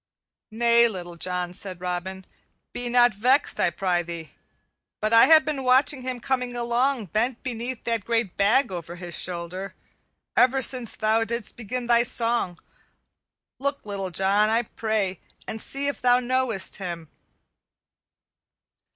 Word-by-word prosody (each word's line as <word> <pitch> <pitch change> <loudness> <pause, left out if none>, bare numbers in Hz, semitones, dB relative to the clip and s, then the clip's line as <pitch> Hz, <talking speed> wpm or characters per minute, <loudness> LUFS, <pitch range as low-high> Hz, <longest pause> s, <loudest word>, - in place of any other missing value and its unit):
"Nay, 235 +1 +4
Little 175 -5 -7
John," 180 +1 -1
said 185 -1 -4
Robin, 180 +1 -5 0.5
"be 245 0 -4
not 245 -1 +4
vexed, 255 +8 +2
I - - +3
prythee; 175 -3 -3 0.7
but 215 +1 -1
I 230 - +7
have 315 -1 +7
been 290 -3 -3
watching 260 +2 +3
him 255 -1 -4
coming 250 -1 -2
along, 240 +1 0
bent 235 +3 -1
beneath 245 0 -5
that 230 -3 -1
great 225 -4 -1
bag 215 +4 +2
over 175 -1 -6
his 175 -2 -5
shoulder, 185 +2 -3 0.6
ever 260 +2 +4
since 250 -3 +1
thou 220 +1 +1
didst 235 -1 -4
begin 245 +2 -5
thy 235 0 +4
song. 235 -6 0 1.0
Look, 280 -1 -2
Little 200 -2 -4
John, 195 +4 +3
I 230 +2 +2
pray, 215 -5 -2 0.3
and 220 - -5
see 275 +1 -1
if 285 - -2
thou 245 0 +4
knowest 250 -4 0
him." 170 -4 -6
225 Hz, 140 wpm, -24 LUFS, 190-250 Hz, 1.0 s, I